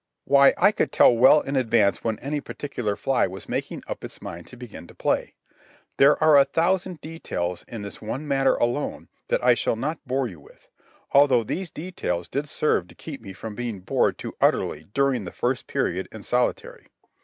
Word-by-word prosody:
Why, 140 -1 +6
I 205 - +5
could - - -1
tell 120 - +6
well 130 +5 +6
in 140 - -4
advance 115 -6 +2
when 110 -2 -1
any 145 +2 -3
particular 120 -10 -4
fly 130 -1 +1
was 95 0 -9
making - - -4
up - - -6
its - - -9
mind 85 +1 -8
to 125 - -13
begin 120 -8 -10
to - - -16
play. - - -1 0.6
There 140 +2 +6
are 155 -2 +7
a - - +7
thousand 175 +4 0
details 90 - -4
in 115 -3 -7
this 100 - -9
one 130 +8 -5
matter 135 -1 +2
alone 120 +5 -2 0.2
that - - 0
I 125 0 +6
shall 120 - 0
not 150 +8 -3
bore 130 +1 0
you 90 -8 -11
with, 70 - -20 0.4
although 140 -4 +5
these 180 - -4
details 145 - -4
did 145 +8 -3
serve 120 - +1
to - - -17
keep 145 -6 -9
me 100 -3 -9
from 110 +3 -7
being 115 -4 -5
bored 90 - +1
too - - -7
utterly 75 +1 +1
during 140 -5 +2
that 90 - -9
first 125 0 -1
period 95 +2 -1
in 110 -2 -10
solitary. 125 0 -1
125 Hz, 195 wpm, -24 LUFS, 105-145 Hz, 0.6 s, are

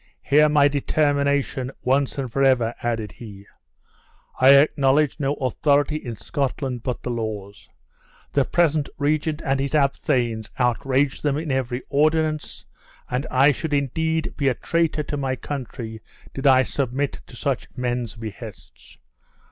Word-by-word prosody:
Hear 150 +2 +4
my 145 -1 +5
determination, 140 -2 0
once 135 +2 +1
and 130 -4 -4
forever!" 130 -4 +3
added 115 -3 -2
he. 100 -4 -11 0.9
"I 135 +2 +8
acknowledge 140 +1 +3
no 140 0 0
authority 145 +3 +1
in 120 -6 -6
Scotland 130 +1 -3
but 125 +1 -4
the 125 - -2
laws. 105 -3 -6 0.6
The 140 - +3
present 155 -2 +1
regent 150 +1 0
and 135 -1 +1
his 140 +2 -1
abthanes 125 -6 0
outrage 130 +3 +1
them 145 -1 0
in 155 -2 -3
every 130 -1 -2
ordinance, 155 +1 0 0.5
and 125 +2 -1
I 135 +3 +5
should 150 +1 -2
indeed 160 +4 -1
be 140 - 0
a 130 - +2
traitor 165 -2 0
to 145 - -4
my 135 -2 -1
country 120 -3 -6 0.3
did 135 +1 -1
I 130 -1 +6
submit 135 +1 -2
to - - -13
such - - -2
men's 120 -3 -2
behests. 110 -2 -10
135 Hz, 140 wpm, -23 LUFS, 125-145 Hz, 0.9 s, I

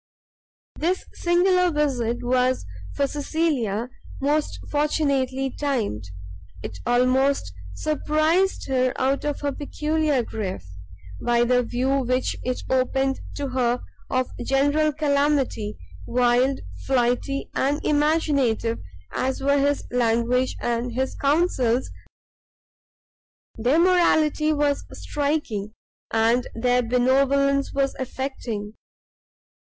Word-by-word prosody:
This 360 +4 -1
singular 360 +1 +3
visit 260 -7 0
was 255 +1 +1 0.3
for 280 - +2
Cecilia 275 -7 -1 0.3
most 295 +2 0
fortunately 275 -3 0
timed: 230 - -2 0.6
it 90 - -7
almost 255 - +2 0.2
surprised 310 - +1
her 255 -1 +1
out 270 +2 +1
of 295 -1 -2
her 285 -1 0
peculiar 300 -1 0
grief, 190 - -5 0.6
by 240 0 +3
the 250 +1 +3
view 255 +3 0
which 255 0 0
it 255 0 -2
opened 265 +1 +1 0.2
to 280 -1 -3
her 250 -1 0 0.3
of 255 0 0
general 285 +4 +2
calamity; 280 - 0 0.3
wild, 250 +2 +2 0.2
flighty, 255 +1 0
and 285 +2 +1
imaginative 290 -7 +1 0.3
as 260 +1 -1
were 280 +1 +2
his 285 +1 +1
language 245 +1 +1
and 240 0 -1
his 260 +2 -1
counsels, 275 -5 +1 1.6
their 245 +7 +2
morality 325 -3 +3
was 290 -1 +1 0.2
striking, 280 -9 -2 0.4
and 230 +2 +2
their 245 +2 +2
benevolence 275 +3 +2
was 275 -1 0
affecting. 250 -5 -4
270 Hz, 100 wpm, -24 LUFS, 245-295 Hz, 1.6 s, singular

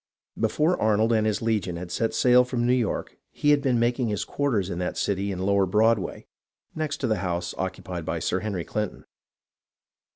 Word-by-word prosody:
Be 110 - +3
fore 155 +10 +1
Arnold 110 +1 +3
and 110 -1 +2
his 110 +1 -1
legion 105 -6 0
had 85 +1 -7
set 115 +5 -1
sail 125 0 +5
from 125 -1 -2
New 125 - +3
York 120 -4 -2
he 145 - +1
had 145 -1 +4
been 130 -3 +2
making 120 +1 +1
his 105 -2 -2
quarters 110 -10 -1
in 85 - -3
that 90 - -3
city 100 0 -1
in 95 - -4
lower 100 +1 +2
Broad 110 +3 +3
way, - - -6 0.5
next 155 -2 -2
to - - 0
the 110 -2 +1
house 85 -2 -2
occupied 95 -2 -4
by - - -2
Sir - - -1
Henry 100 -6 -3
Clinton. 105 -2 -4
110 Hz, 200 wpm, -25 LUFS, 95-120 Hz, 0.5 s, sail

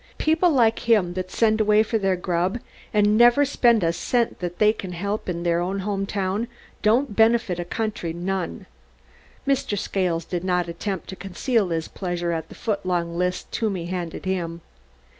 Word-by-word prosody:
"People 320 +3 +3
like 235 -5 +2
him 195 -6 +4
that 185 0 -4
send 220 +1 +2
away 210 0 +4
for 225 0 -1
their 195 -2 +1
grub 180 +3 -1 0.3
and 210 0 +3
never 240 +4 +6
spend 235 -6 +3
a 165 0 +2
cent 235 +6 0
they 180 +5 +2
can 185 -4 -7
help 200 +4 -3
in 170 -1 -3
their 170 0 +1
home 195 +2 -2
town 195 +3 -1 0.3
don't 230 +2 +2
benefit 225 -5 +3
a 175 - -3
country 210 -3 -3
none." 175 - -3 0.8
Mr. 270 -6 +1
Scales 180 -4 -1
did 175 -1 -3
not 180 -2 +1
attempt 185 +3 -4
to 190 - -5
conceal 200 +2 -1
his 165 -1 -2
pleasure 175 -2 -3
at 160 -1 -3
the - - -11
foot 210 -4 -2
long 175 -2 -1
list 180 +1 -2
Toomey 195 -6 -1
handed 175 0 -5
him. 170 -3 -2
190 Hz, 170 wpm, -24 LUFS, 175-220 Hz, 0.8 s, never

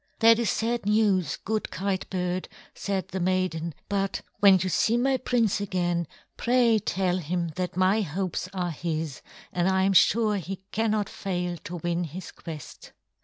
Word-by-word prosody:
"That 230 0 +6
is 235 - +1
sad 230 -1 -1
news, 200 -7 +2
good 215 +1 -2
Kite 190 0 -2
bird," 180 -1 -2 0.2
said 190 -2 -3
the 190 - -3
maiden, 180 -3 0
"but 195 -1 -1 0.2
when 200 -2 +7
you 185 +1 -1
see 220 +6 +2
my 265 +2 +2
prince 235 -5 +1
again, 175 -4 -1 0.3
pray 240 -2 +3
tell 185 -2 0
him 170 +1 -2
that 180 +2 -4
my 190 +4 +3
hopes 185 +1 -3
are 180 -2 -2
his, 160 -3 -3 0.3
and 175 +1 +2
I 190 0 +2
am 195 +1 +3
sure 215 +2 +4
he 190 +1 -6
cannot 215 -2 +1
fail 180 -3 -3
to 180 - -5
win 175 0 -1
his 170 +3 -8
quest." 155 -5 -10
185 Hz, 165 wpm, -27 LUFS, 175-210 Hz, 0.3 s, when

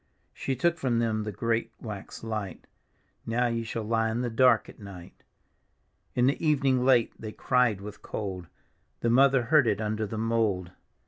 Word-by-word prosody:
She 135 - -3
took 170 +6 +1
from 125 -5 0
them 110 -2 0
the 105 - -3
great 115 +3 -1
wax 105 -3 -8
light, 110 -4 -5 0.3
" - - -41 0.2
Now 120 +2 +1
ye 115 -1 -1
shall 115 0 -4
lie 115 +1 +1
in 115 +2 -2
the 120 -1 -2
dark 115 -2 +4
at - - -14
nig^t." 100 -4 -10 1.0
In 125 - +3
the 140 - +2
evning 135 -5 +2
late 125 -3 +3
they 110 - -5
cried 115 -4 +1
with 105 +1 -9
cold, 95 -5 -5 0.5
The 115 - +1
mother 135 0 +5
heard 135 +1 +4
it 105 -2 +1
under 110 0 -2
the 110 - -5
mould. 110 -5 0
115 Hz, 180 wpm, -27 LUFS, 105-125 Hz, 1.0 s, mother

